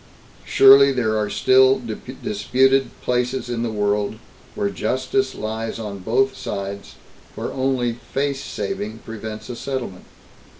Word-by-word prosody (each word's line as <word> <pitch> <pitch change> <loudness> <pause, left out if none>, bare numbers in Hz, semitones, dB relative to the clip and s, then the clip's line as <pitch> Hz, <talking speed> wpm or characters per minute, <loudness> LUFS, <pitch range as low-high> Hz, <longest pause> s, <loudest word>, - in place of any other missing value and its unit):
Surely 135 +1 +7
there 120 -4 0
are 105 -1 0
still 130 +3 +4 0.4
disputed 130 +6 +2
places 125 0 -1
in 120 -1 -2
the 120 - -1
world, 105 0 0 0.4
where 100 - -1
justice 130 +5 -1
lies 110 +1 -4
on 105 -3 -6
both 130 +7 +1
sides, 100 0 -6 0.4
where - - -4
only 130 -3 0
'face 135 +3 -3
saving' 105 +1 -4
prevents 110 -1 -7
a 125 - -6
settlement. 125 -9 -5
120 Hz, 125 wpm, -22 LUFS, 105-130 Hz, 0.4 s, Surely